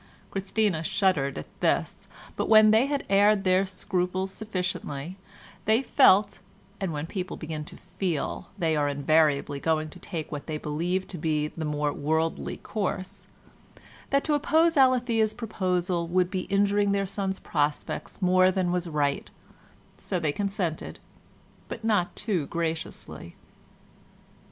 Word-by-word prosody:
Christina 195 -3 0
shuddered 160 -6 +1
at 75 - -10
this, - - 0 0.3
but - - -2
when 215 -1 +8
they 225 +5 +4
had 285 -1 -2
aired 200 +1 +4
their 185 +1 +3
scruples 185 0 -2
sufficiently 180 -6 -4 0.5
they 220 +5 +3
felt 210 -8 +4 0.4
(and 190 -3 -2
when 150 0 -3
people 185 +2 -5
begin 155 -1 -5
to - - -9
"feel," 175 -5 -3
they 165 -4 +1
are 145 -1 +1
invariably 145 0 +2
going 155 0 0
to - - -12
take 160 -3 -6
what 145 -2 -6
they 155 -1 -2
believe 170 +6 -2
to 180 - -7
be 150 -1 0
the 160 0 -5
more 150 -1 -1
worldly 160 +2 -1
course) 190 -2 -4 0.8
that 275 0 +2
to 305 - 0
oppose 320 +3 +3
Alethea's 245 -5 +3
proposal 180 -6 -1
would 180 +1 +1
be 185 -2 -2
injuring 200 0 +2
their 200 0 +1
son's 190 0 -2
prospects 150 +5 -2
more 185 0 +5
than 185 -2 0
was 180 -1 -1
right, 145 -2 -1 0.7
so 185 - -2
they 155 -3 0
consented, 195 -2 -3 0.7
but - - -7
not 205 -6 +1
too 190 -9 -1
graciously. 160 - -4
185 Hz, 140 wpm, -27 LUFS, 155-200 Hz, 0.8 s, when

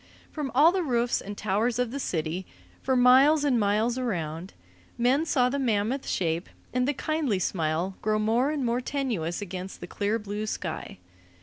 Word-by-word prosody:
From 295 -3 -3
all 305 +5 +7
the 375 0 0
roofs 245 -6 +1
and 205 +1 -7
the - - -11
towers 215 +4 0
of 250 -2 0
the 280 - -4
city, 170 - -3 0.3
for 260 - +1
miles 265 +5 +6
and 265 -5 +2
miles 215 +4 +1
around, 175 -7 -3 0.4
men 265 +7 +2
saw 250 -5 +3
the 280 +3 -1
mammoth 240 +1 0
shape 170 -1 -1 0.2
and 250 0 +1
the 290 - +1
kindly 310 - 0
smile 170 +1 -1
grow 215 0 +1
more 225 +6 +2
and 295 -4 -1
more 240 +1 0
tenuous 225 - -2
against 185 0 -7
the - - -6
clear 205 +5 -1
blue 210 0 -5
sky. 165 - -5
230 Hz, 180 wpm, -27 LUFS, 190-260 Hz, 0.4 s, all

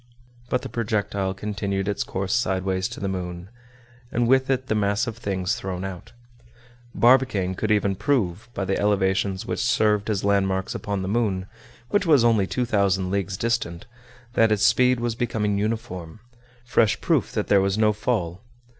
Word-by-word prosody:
But 125 - 0
the - - -4
projectile 100 -4 -1
continued 100 -1 -3
its 100 - -1
course 95 0 -3
sideways 95 -4 0
to - - -8
the 100 - -2
moon, 90 -1 -5 0.6
and 120 -1 +1
with 130 +1 +3
it 130 -1 +1
the 120 - -1
mass 105 +1 +1
of 115 -3 -5
things 95 -2 -1
thrown 95 -5 -4
out. 95 +4 -8 0.8
Barbicane 120 -7 +3
could 110 +3 -3
even 105 -2 +2
prove, 105 - -1
by 95 - -2
the 95 +1 -1
elevations 95 -1 +1
which - - -3
served 110 -3 +2
as 100 -3 -1
landmarks 95 -2 +1
upon 100 -2 -3
the - - -3
moon, 100 -3 0 0.5
which 205 -3 +2
was 145 -7 +5
only 110 -5 +3
two 125 +4 -1
thousand 95 -4 +1
leagues 95 -1 -1
distant, 110 -6 -2 0.5
that 115 -2 +4
its 105 -1 +2
speed 125 -1 +4
was 120 -1 -1
becoming 105 -3 -1
uniform—fresh 115 +3 -2
proof - - +1
that - - -1
there 100 -1 +4
was 100 +1 0
no 110 -1 +3
fall. 100 -5 -2
100 Hz, 165 wpm, -24 LUFS, 95-115 Hz, 0.8 s, was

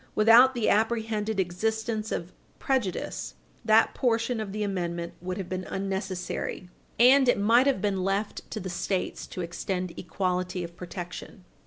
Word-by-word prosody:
Without 235 +4 +7
the 235 -3 0
apprehended 220 -1 +1
existence 220 +4 -1
of 170 +2 -4 0.2
prejudice, 255 - -2 0.3
that 220 0 +4
portion 230 -1 0
of 215 -3 -4
the 210 +1 -2
amendment 170 -4 -3
would 180 +1 -4
have 190 -3 -4
been 185 0 -3
unnecessary, 190 -2 -4 0.3
and 260 +2 +7
it - - +4
might 230 +6 +4
have 260 -8 +1
been 195 -3 0
left 195 +2 -2
to - - -4
the 185 - -6
States 185 +1 -2
to 185 - -6
extend 180 +1 -3
equality 180 +1 -2
of 170 0 -8
protection. 180 +2 -8
200 Hz, 150 wpm, -27 LUFS, 180-225 Hz, 0.3 s, Without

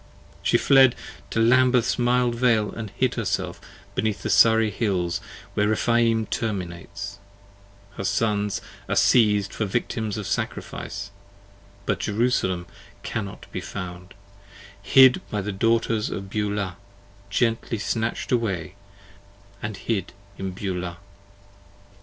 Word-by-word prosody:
She - - +3
fled 135 -2 +6 0.3
to - - -1
Lambeth's 125 +1 +4
mild 120 0 +2
Vale 115 -3 +2
and 110 -2 -6
hid 130 -2 +2
herself 95 -5 -2 0.3
beneath 110 -2 -1
The - - -1
Surrey 110 -1 +5
Hills 90 -7 -1 0.3
where 105 - +2
Rephaim 115 +1 +2
terminates; 100 -1 -4 0.8
her - - -3
Sons 105 0 0 0.3
are - - +1
siez'd 105 -4 +4
For 110 - -1
victims 110 0 -2
of 105 - -4
sacrifice; 100 +1 -4 0.7
but - - 0
Jerusalem 105 -5 0 0.4
cannot 100 -4 -5
be - - -4
found; 90 -1 -7 0.7
Hid 130 +6 +6
By 105 - -1
the 105 +2 -3
Daughters 115 +1 +1
of 95 -1 -6
Beulah, 105 -3 -2 0.5
gently 115 +2 0
snatch'd 110 +2 -2
away, 95 -8 0 0.9
and 105 -2 -4
hid 100 -5 -2 0.2
in 95 0 -4
Beulah. 90 -2 -4
105 Hz, 115 wpm, -24 LUFS, 95-115 Hz, 0.9 s, fled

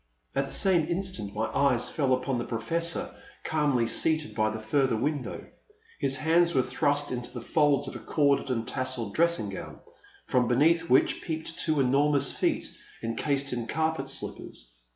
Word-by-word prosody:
'* - - -38
At 135 0 +1
the - - -9
same 175 -5 +2
instant 170 - -3
my 110 +1 0
eyes 135 -4 +2
fell 140 -4 0
upon 130 0 -2
the - - -2
Professor, 165 +10 -2 0.3
calmly 145 -6 +1
seated 155 +7 0
by 110 -1 +1
the 110 0 -5
further 125 +2 +1
win 145 +4 0
dow. - - -6 0.6
His 135 -2 +1
hands 170 +3 +2
were 130 - +4
thrust 145 0 0
into 125 -1 -4
the 120 -2 -7
folds 145 -3 +2
of - - -6
a - - -5
corded 140 -2 +1
and 115 -3 -1
tasselled 130 -5 -3
dressing 170 +1 +2
gown, - - -8 0.5
from 125 -2 +2
beneath 155 +7 +3
which 130 - +3
peeped 160 0 -5
two 155 -2 +1
enormous 140 +1 +3
feet - - -1 0.3
encased 140 +4 -1
in 120 -2 -3
car 160 +5 0
pet 135 -3 -6
slippers. - - -8
140 Hz, 175 wpm, -28 LUFS, 125-155 Hz, 0.6 s, were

